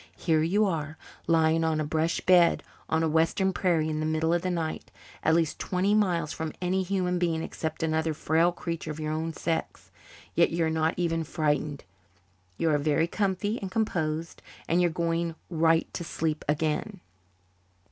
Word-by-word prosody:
"Here 160 -2 +2
you 200 +7 +2
are, 160 -4 -2 0.3
lying 165 0 +3
on 160 -1 +1
a - - +1
brush 160 +2 0
bed 180 -2 +4 0.3
on 160 +1 +1
a - - +2
western 165 +5 +2
prairie 170 -4 +1
in 155 -1 -2
the 155 - -1
middle 160 +1 +1
of 175 - +1
the 185 - -2
night, 165 -3 -3 0.3
at 160 - +3
least 165 -2 0
twenty 190 +2 0
miles 175 -7 +1
from 160 -1 -4
any 185 +1 0
human 180 -1 0
being 165 -2 0
except 160 0 -4
another 160 0 0
frail 165 +3 +2
creature 170 -2 -5
of 155 0 -5
your 155 0 -2
own 160 +1 -2
sex. 160 0 -3 0.4
Yet - - +4
you're 165 -1 +1
not 160 0 +1
even 165 -2 0
frightened. 150 -2 -1 0.7
You 165 - +1
are 145 - +2
very 155 +2 +2
comfy 200 +4 -1
and 195 - -4
composed, 165 -6 -2 0.3
and 170 +2 +2
you're 175 - +3
going 165 0 -1 0.2
right 165 0 +3
to - - -4
sleep 160 -1 -2
again." 160 +6 -1
165 Hz, 175 wpm, -27 LUFS, 155-175 Hz, 0.7 s, bed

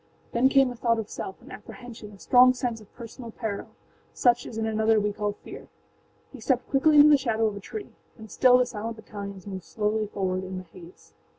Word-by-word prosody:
â - - -36
Then 245 +3 +3
came 270 -1 +4
a - - -8
thought 230 -1 +1
of 225 - -3
selfâan 190 - -8
apprehensionâa 215 -2 -11
strong 255 +7 +5
sense 240 -3 -3
of 210 - -18
personal 235 0 -9
peril, 220 -3 -5 0.5
such 240 -1 +2
as 220 - -8
in 220 - -1
another 220 0 +2
we 210 0 -1
call 205 0 -2
fear. - - -12 0.7
He 265 - -10
stepped 255 +1 0
quickly 295 +3 +4
into 295 +1 +9
the 295 - +7
shadow 225 -4 0
of 210 -2 -1
a - - -6
tree. 410 - -8 0.3
And 220 -2 -12
still 250 -1 +5
the 250 - +3
silent 230 -1 -5
battalions 200 -3 -9
moved 190 -3 -7
slowly 210 +5 -1
forward 190 -2 -2
in 185 0 -6
the 185 - -6
haze. 175 0 -16
220 Hz, 210 wpm, -26 LUFS, 205-245 Hz, 0.7 s, into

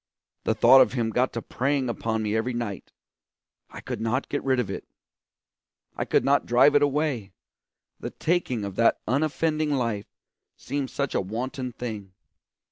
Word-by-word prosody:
The 110 - +1
thought 125 +4 +7
of - - +3
him 115 -3 -1
got 125 +3 +1
to 115 - -4
preying 135 0 -1
upon 115 -1 -2
me 105 0 -1
every 120 +2 -1
night; 115 -5 -5 0.8
I - - -10
could - - -5
not 115 +4 -1
get 145 - -2
rid 130 -2 +2
of 120 - -1
it. - - -6 1.1
I - - -2
could - - +2
not 140 +1 +2
drive 125 +4 +5
it 145 - +5
away, 140 -8 0 0.7
the - - -5
taking 155 - -1
of 100 -1 -6
that 115 - +3
unoffending 155 +4 0
life 115 -6 -2 0.5
seemed 140 -2 -3
such 140 -1 -2
a - - +1
wanton 125 +6 -4
thing. 105 -6 -6
125 Hz, 165 wpm, -26 LUFS, 110-140 Hz, 1.1 s, thought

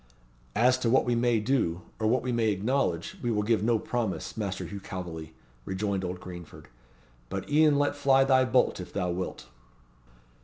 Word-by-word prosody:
"As 125 +3 +4
to 120 - +1
what 130 - +4
we 120 - +1
may 120 -1 +2
do, 105 -8 0 0.2
or 110 - +1
what 120 +2 +2
we 125 - -1
may 115 -2 +2
acknowledge, 100 -4 -1
we 120 - -1
will 105 -2 +1
give 110 -1 +2
no 115 +1 +3
promise, 110 -2 -3
Master 100 -4 -3
Hugh 100 - -6
Calveley," 85 -4 -7 0.3
rejoined 95 +3 -2
old 90 0 -4
Greenford. 85 -3 -10 0.6
"But 95 0 -4
e'en 150 -1 +5
let 145 0 +1
fly 135 -2 +4
thy 130 -1 +4
bolt, 125 -4 +2
if 90 - -7
thou 90 -3 -1
wilt." 90 -7 -4
110 Hz, 180 wpm, -28 LUFS, 95-125 Hz, 0.6 s, e'en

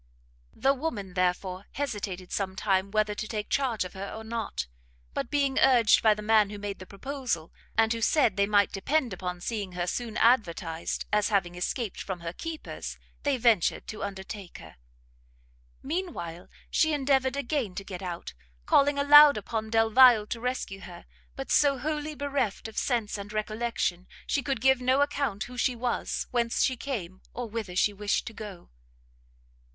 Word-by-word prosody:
The 270 - +3
woman 235 - -4
therefore 185 +1 -1
hesitated 200 -9 -4
some 190 -2 -2
time 195 -1 +1
whether 215 0 +1
to 215 +1 -5
take 210 -2 -4
charge 245 -8 +1
of 180 - -8
her 195 +1 -6
or, 220 - -7
not: 220 - -3 0.5
but - - -3
being 280 -2 +1
urged 245 -5 +5
by 215 -2 +5
the 210 - -7
man 215 -1 +4
who 205 - -7
made 205 -1 -5
the 185 - -10
proposal, 240 - -4 0.2
and 225 0 +4
who 230 - -4
said 235 -4 +3
they 200 0 +2
might 205 -1 +3
depend 250 +4 0
upon 180 -1 -5
seeing 205 -3 -3
her 175 0 -2
soon 225 +4 -3
advertised, 170 -8 +1
as 210 0 +3
having 190 -5 +1
escaped 190 +5 -3
from 185 -3 -5
her 170 0 -5
keepers, 325 - -6 0.2
they 285 -2 +1
ventured 230 -7 +2
to 215 - -6
undertake 195 -1 -7
her. 80 -4 -13 1.1
Mean 350 +5 -2
while 170 +1 -7 0.2
she 315 -1 +3
endeavoured 270 -2 +2
again 275 -8 -2
to 195 - -4
get 190 -2 -7
out, 175 -2 -6 0.3
calling 285 0 +4
aloud 290 0 +8
upon 220 +1 -3
Delvile 225 0 +6
to 230 +2 -5
rescue 250 -6 -3
her, 175 -2 -11 0.3
but 270 - -5
so 280 -2 +4
wholly 300 +2 -3
bereft 280 -8 -2
of 220 - -11
sense 225 -5 -1
and 200 +1 -7
recollection, 215 -4 -2 0.2
she 285 - 0
could 265 -4 -2
give 265 0 +4
no 260 +2 +3
account 280 -7 0
who 250 +2 -10
she 250 +1 +2
was, 240 0 -2
whence 235 -1 +1
she 260 - +2
came, 205 -9 -5
or 245 -1 -3
whither 215 -5 -5
she 205 +2 +3
wished 205 0 -1
to 225 - -7
go. 205 - -9
220 Hz, 175 wpm, -28 LUFS, 195-260 Hz, 1.1 s, aloud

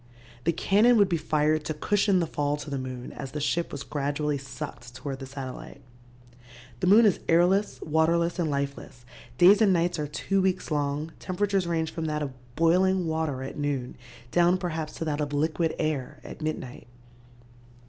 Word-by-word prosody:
The 170 - +4
cannon 215 +8 +4
would 200 -2 +4
be 170 - +1
fired 155 0 +1
to 155 - -3
cushion 200 +3 +2
the - - +1
fall 145 -2 -1
to 145 0 -8
the 140 - -2
moon 130 -1 -6
as 135 -2 -7
the 150 - -3
ship 160 +4 -1
was 140 - -5
gradually 145 0 -2
sucked 135 -3 -8
toward 135 0 -5
the 135 - -7
satellite. 135 0 -8 1.0
"The - - 0
moon 215 +5 +7
is 205 - +3
airless, 180 +5 +3
waterless 170 +3 +1
and 165 -3 +1
lifeless, 140 -3 -4 0.3
days 195 - +7
and 210 -3 +5
nights 175 -1 +1
are 150 - -2
two 195 +6 -1
weeks 185 -2 -1
long, 145 +1 -1
temperatures 195 0 -1
range 160 -2 -1
from 165 -1 -4
that 150 -1 -1
of 135 -2 -5 0.2
boiling 180 +3 +3
water 160 -5 -2
at 135 - -7
noon 140 -4 -2 0.4
down 175 +1 +4
perhaps 160 -4 -4
to 165 - -5
that 150 -1 -1
of 145 0 -3
liquid 160 +2 0
air 155 -5 -2
at - - -10
midnight. 155 -7 -5
155 Hz, 180 wpm, -27 LUFS, 145-175 Hz, 1.0 s, moon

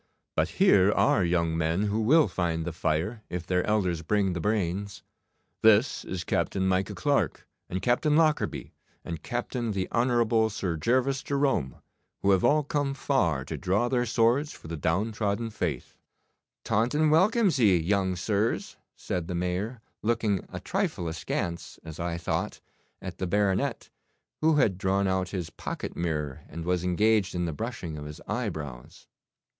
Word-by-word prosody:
But - - +1
here 100 0 +5
are 95 - +3
young 85 -2 +1
men 80 +4 0
who 105 +1 0
will 150 +8 +5
find 80 -3 -1
the 85 - -3
fire 85 +8 -1
if 90 -1 -4
their 90 -1 +1
elders 95 -6 +1
bring 95 +2 +1
the 85 - -3
brains. 100 -1 -1 0.6
This 110 +3 +4
is 90 -2 -4
Captain 95 +1 0
Micah 95 0 0
Clarke, - - 0 0.2
and 95 +1 -3
Captain 145 +5 +2
Lockarby, 155 -1 +1 0.3
and 85 -2 -5
Captain 120 +1 -3
the 95 -1 -1
Honourable 115 -2 +2
Sir 95 -5 -2
Gervas 130 - +1
Jerome, 135 - 0 0.5
who 100 - +4
have 95 -2 +3
all 150 +1 +4
come 145 -2 -1
far 85 - +1
to - - -5
draw 105 +7 +1
their 125 -2 +1
swords 120 +6 +2
for - - -13
the 85 - -4
downtrodden 105 +7 -1
faith.' 80 - -3 0.7
'Taunton 150 +8 +2
welcomes 190 - +3
ye, 100 -6 +5
young 95 +2 +1
sirs,' 105 +4 -1 0.2
said 90 -3 -3
the 90 - -3
Mayor, 90 +7 -2 0.2
looking 110 -4 0
a - - -5
trifle 85 - -2
askance, 85 +1 -4
as 80 -1 -9
I 85 0 -2
thought, 85 - -2 0.4
at - - -7
the 95 - -1
baronet, 100 0 0 0.5
who 160 0 +3
had 105 -10 +2
drawn 95 +1 +1
out 95 -1 0
his 90 -5 -4
pocket - - -6
mirror, 75 -5 -2
and 80 +2 -6
was 90 0 0
engaged 100 +2 +2
in 90 0 0
the 80 - -2
brushing 90 -6 -5
of 75 - -7
his 75 0 -8
eyebrows. 60 -6 -5
95 Hz, 160 wpm, -27 LUFS, 85-115 Hz, 0.7 s, here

